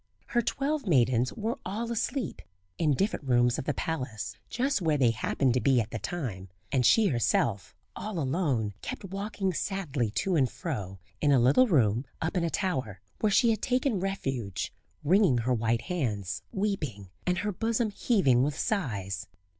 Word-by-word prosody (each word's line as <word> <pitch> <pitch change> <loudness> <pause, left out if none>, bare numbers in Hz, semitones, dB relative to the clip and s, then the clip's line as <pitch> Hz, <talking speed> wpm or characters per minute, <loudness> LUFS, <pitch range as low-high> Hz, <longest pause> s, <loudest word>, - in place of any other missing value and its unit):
Her 240 - +2
twelve 280 +2 -1
maidens 125 -5 +3
were 225 +1 -3
all 225 +5 -3
asleep 235 +3 -2 0.4
in 150 -4 +3
different 170 -5 -1
rooms 120 -1 +3
of - - -5
the 150 - 0
palace, 130 -9 -3
just 270 -2 0
where 160 -3 +2
they 125 -4 +4
happened 125 +3 +1
to 125 - +1
be 135 -3 +4
at 110 -1 -2
the 115 - -3
time; 105 - -4 0.2
and 130 -2 +2
she 215 - +5
herself, 115 -4 0 0.2
all 215 -3 -5
alone, 135 - 0
kept - - -6
walking 195 0 -2
sadly 155 - -1
to 185 - +1
and 135 -5 +3
fro 100 - -5 0.2
in 150 - +4
a 135 - +5
little 135 - +5
room 125 - +3
up 160 +4 -2
in 180 - +1
a 170 - +1
tower, 130 - -2 0.2
where 215 - +2
she 235 +3 +5
had 220 - -1
taken 250 -4 +1
refuge 135 - -3 0.3
wringing 180 - +4
her 120 +2 +1
white 115 0 +1
hands, 105 - -2
weeping, 150 - -2 0.2
and 180 0 +2
her 210 +2 -1
bosom 225 +2 0
heaving 190 - +3
with 140 +2 0
sighs. 100 - -2
145 Hz, 170 wpm, -29 LUFS, 120-200 Hz, 0.4 s, she